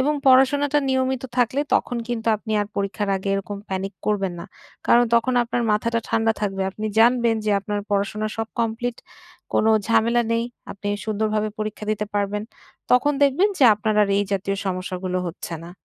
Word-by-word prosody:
এবং 290 Hz, +3 st, +2 dB
পড়াশোনাটা 270 Hz, +2 st, +5 dB
নিয়মিত 260 Hz, 0 st, 0 dB
থাকলে 250 Hz, +3 st, +2 dB
তখন 245 Hz, -, 0 dB
কিন্তু 230 Hz, -2 st, -3 dB
আপনি 220 Hz, +1 st, -6 dB
আর 205 Hz, -, -1 dB
পরীক্ষার 200 Hz, +1 st, -2 dB
আগে 190 Hz, +1 st, -5 dB
এরকম 195 Hz, +1 st, -4 dB
প্যানিক 195 Hz, +1 st, -3 dB
করবেন 195 Hz, -3 st, 0 dB
না। -, -, -7 dB, 0.4 s
কারণ 240 Hz, +1 st, +5 dB
তখন 240 Hz, +2 st, +2 dB
আপনার 240 Hz, 0 st, -2 dB
মাথাটা 230 Hz, +2 st, 0 dB
ঠান্ডা 225 Hz, 0 st, +2 dB
থাকবে। 195 Hz, -2 st, -1 dB
আপনি 215 Hz, +3 st, -5 dB
জানবেন 235 Hz, 0 st, +4 dB
যে 215 Hz, -, +1 dB
আপনার 205 Hz, +1 st, -3 dB
পড়াশোনা 205 Hz, +1 st, 0 dB
সব 225 Hz, 0 st, -3 dB
কমপ্লিট। 230 Hz, +1 st, -2 dB, 0.6 s
কোনো 220 Hz, -, +3 dB, 0.2 s
ঝামেলা 230 Hz, +1 st, +3 dB
নেই। 230 Hz, 0 st, +1 dB, 0.3 s
আপনি 200 Hz, +1 st, -6 dB, 0.2 s
সুন্দরভাবে 215 Hz, 0 st, -1 dB
পরীক্ষা 215 Hz, 0 st, -4 dB
দিতে 210 Hz, 0 st, -1 dB
পারবেন। 205 Hz, 0 st, -1 dB, 0.5 s
তখন 255 Hz, +4 st, +4 dB
দেখবেন 285 Hz, +9 st, +4 dB
যে 270 Hz, -, +5 dB
আপনার 215 Hz, +1 st, -1 dB
আর 205 Hz, -, +1 dB
এই 205 Hz, -, +1 dB
জাতীয় 195 Hz, 0 st, -1 dB
সমস্যাগুলো 185 Hz, 0 st, -3 dB
হচ্ছে 170 Hz, 0 st, -6 dB
না। 170 Hz, -, -9 dB
215 Hz, 170 wpm, -23 LUFS, 200-240 Hz, 0.6 s, পড়াশোনাটা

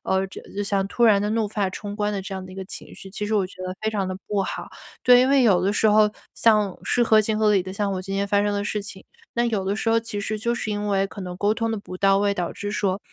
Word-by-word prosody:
呃， 190 Hz, 0 st, +1 dB
这 -, -, -9 dB, 0.2 s
就 205 Hz, -, 0 dB
像 200 Hz, -1 st, 0 dB
突 235 Hz, +3 st, +1 dB
然 205 Hz, -3 st, +5 dB
地 205 Hz, -, -1 dB
怒 220 Hz, 0 st, 0 dB
发 205 Hz, -2 st, -1 dB
冲 205 Hz, +2 st, -6 dB
冠 210 Hz, 0 st, -1 dB
的 195 Hz, -2 st, -3 dB
这 195 Hz, 0 st, -6 dB
样 185 Hz, -1 st, -6 dB
的 -, -, -12 dB
一 185 Hz, -, -10 dB
个 190 Hz, -, -6 dB
情 185 Hz, -, -9 dB
绪， 195 Hz, -, -11 dB
其 210 Hz, +1 st, -4 dB
实 215 Hz, -, -1 dB
我 195 Hz, -3 st, +2 dB
觉 185 Hz, -, -16 dB
得 185 Hz, -, -4 dB
非 220 Hz, -, 0 dB
常 195 Hz, -3 st, -1 dB
地 185 Hz, -, -4 dB
不 200 Hz, -2 st, 0 dB
好。 -, -, -5 dB, 0.3 s
对， 245 Hz, 0 st, +7 dB
因 260 Hz, -, +3 dB
为 275 Hz, -2 st, +5 dB
有 195 Hz, -7 st, +4 dB
的 195 Hz, +2 st, +1 dB
时 220 Hz, -, +3 dB
候 210 Hz, 0 st, +5 dB, 0.2 s
像 210 Hz, -4 st, +3 dB
是 245 Hz, -, +2 dB
合 220 Hz, -2 st, +5 dB
情 215 Hz, 0 st, -1 dB
合 215 Hz, -1 st, +4 dB
理 195 Hz, -3 st, +3 dB
的， 185 Hz, -, -7 dB
像 200 Hz, 0 st, -1 dB
我 185 Hz, -, -2 dB
今 195 Hz, +1 st, -5 dB
天 200 Hz, 0 st, 0 dB
发 200 Hz, 0 st, +2 dB
生 205 Hz, 0 st, 0 dB
的 200 Hz, -, -1 dB
事 210 Hz, 0 st, -2 dB
情， 195 Hz, -1 st, -10 dB, 0.3 s
那 240 Hz, 0 st, +1 dB
有 215 Hz, -5 st, 0 dB
的 195 Hz, +2 st, -1 dB
时 225 Hz, -, 0 dB
候 230 Hz, -, +3 dB
其 225 Hz, -2 st, -6 dB
实 215 Hz, +1 st, -3 dB
就 235 Hz, +2 st, 0 dB
是 220 Hz, -, -3 dB
因 210 Hz, 0 st, -2 dB
为 195 Hz, -1 st, +2 dB
可 200 Hz, -, -10 dB
能 180 Hz, -1 st, -6 dB
沟 205 Hz, +2 st, +2 dB
通 225 Hz, +1 st, -1 dB
得 225 Hz, -, -1 dB
不 185 Hz, -2 st, -9 dB
到 195 Hz, 0 st, +4 dB
位， 200 Hz, 0 st, +2 dB
导 175 Hz, -3 st, -2 dB
致 205 Hz, +1 st, -5 dB
说， 195 Hz, -2 st, 0 dB
205 Hz, 340 characters per minute, -24 LUFS, 195-215 Hz, 0.3 s, 对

